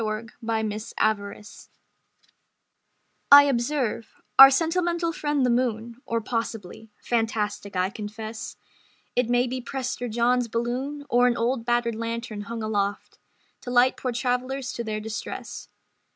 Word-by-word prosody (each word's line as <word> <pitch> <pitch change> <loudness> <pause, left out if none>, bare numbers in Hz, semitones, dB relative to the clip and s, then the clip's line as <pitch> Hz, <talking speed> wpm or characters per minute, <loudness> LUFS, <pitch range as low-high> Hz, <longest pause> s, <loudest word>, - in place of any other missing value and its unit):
Conversation 220 0 -3
Galante 205 -1 -2 1.6
I 285 0 +11
observe: 250 -3 -1 0.2
"Our 270 0 +13
sentimental 335 +3 0
friend 295 -3 0
the 250 - +2
moon 235 -1 -1
Or 230 -2 0
possibly 225 -2 -5
(fantastic, 215 -3 -1
I 185 +1 +1
confess) 215 +2 -7 0.6
It 245 -1 +1
may 245 0 +3
be 255 +1 -4
Prester 250 0 -4
John's 240 +2 +1
balloon 250 +6 -3
Or 245 +1 +4
an 240 - +1
old 235 0 -1
battered 240 -1 +1
lantern 230 -1 -4
hung 230 -1 -5
aloft 205 -2 -2 0.4
To - - -7
light 245 +1 +4
poor 255 - -3
travellers 250 +2 -2
to 235 - -4
their 215 -1 -3
distress." 220 +1 -6
235 Hz, 125 wpm, -25 LUFS, 220-255 Hz, 1.6 s, Our